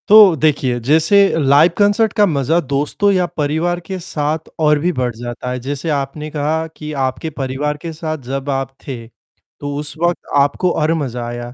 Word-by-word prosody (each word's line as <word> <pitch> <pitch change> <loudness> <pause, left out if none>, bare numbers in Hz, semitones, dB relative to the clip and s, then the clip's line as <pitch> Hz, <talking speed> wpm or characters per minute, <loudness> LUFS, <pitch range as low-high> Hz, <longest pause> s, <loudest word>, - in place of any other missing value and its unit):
तो 210 -4 +8
देखिए 140 -5 +1
जैसे 155 - +3 0.2
लाइव 145 +4 +5
कॉन्सर्ट 205 +1 +3
का 210 - +4
मजा 160 -1 +1
दोस्तों 145 +7 0
या 185 -2 +2
परिवार 160 +4 0
के 180 +2 -6
साथ 155 -1 -3
और 150 -1 +3
भी 175 +4 +1
बढ़ 125 -6 -2
जाता 120 +1 -6
है, 125 - -3
जैसे 140 +5 -4
आपने 145 +1 -3
कहा 155 +2 -1
कि 150 0 -7
आपके 130 +4 -2
परिवार 145 +1 -3
के 165 - -5
साथ 155 0 -4
जब 135 +1 -3
आप 135 -1 -2
थे, 120 -4 -6 0.5
तो 145 0 -4
उस 150 0 -4
वक़्त 175 0 +2 0.2
आपको 145 +6 +2
और 155 0 +1
मजा 125 -7 -3
आया 120 0 -6
150 Hz, 180 wpm, -17 LUFS, 135-165 Hz, 0.5 s, तो